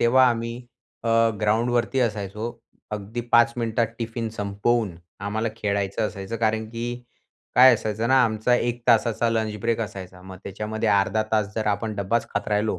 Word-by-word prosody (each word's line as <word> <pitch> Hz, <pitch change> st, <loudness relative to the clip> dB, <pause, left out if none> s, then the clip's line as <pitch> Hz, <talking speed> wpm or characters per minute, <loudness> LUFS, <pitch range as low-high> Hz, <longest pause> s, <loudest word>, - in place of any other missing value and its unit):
तेव्हा 130 Hz, +2 st, +5 dB
आम्ही 115 Hz, 0 st, -2 dB, 0.5 s
अ, 115 Hz, -, -2 dB, 0.3 s
ग्राउंडवरती 120 Hz, +4 st, +1 dB
असायचो. 105 Hz, -2 st, -2 dB, 0.5 s
अगदी 105 Hz, +3 st, -4 dB
5 120 Hz, +3 st, +6 dB
मिनिटात 115 Hz, 0 st, 0 dB
टिफिन 115 Hz, 0 st, -3 dB
संपवून 105 Hz, -1 st, -1 dB, 0.3 s
आम्हाला 110 Hz, +2 st, -1 dB
खेळायचं 100 Hz, 0 st, -1 dB
असायचं, 100 Hz, +3 st, -6 dB
कारण 110 Hz, 0 st, 0 dB
की 115 Hz, 0 st, -4 dB, 0.7 s
काय 130 Hz, 0 st, +9 dB
असायचं 110 Hz, +1 st, -2 dB
ना 130 Hz, -1 st, +5 dB
आमचा 110 Hz, +2 st, +1 dB
1 120 Hz, 0 st, -1 dB
तासाचा 115 Hz, 0 st, +3 dB
लंच 110 Hz, -2 st, -1 dB
ब्रेक 115 Hz, 0 st, 0 dB
असायचा. 95 Hz, -4 st, -6 dB
मग 95 Hz, 0 st, -10 dB
त्याच्यामध्ये 110 Hz, +3 st, -3 dB
अर्धा 100 Hz, +1 st, +2 dB
तास 105 Hz, -2 st, +3 dB
जर 110 Hz, -, -2 dB
आपण 105 Hz, +1 st, -1 dB
डब्बाच 100 Hz, +4 st, 0 dB
खात -, -, -1 dB
राहिलो 105 Hz, -2 st, 0 dB
110 Hz, 155 wpm, -24 LUFS, 105-115 Hz, 0.7 s, काय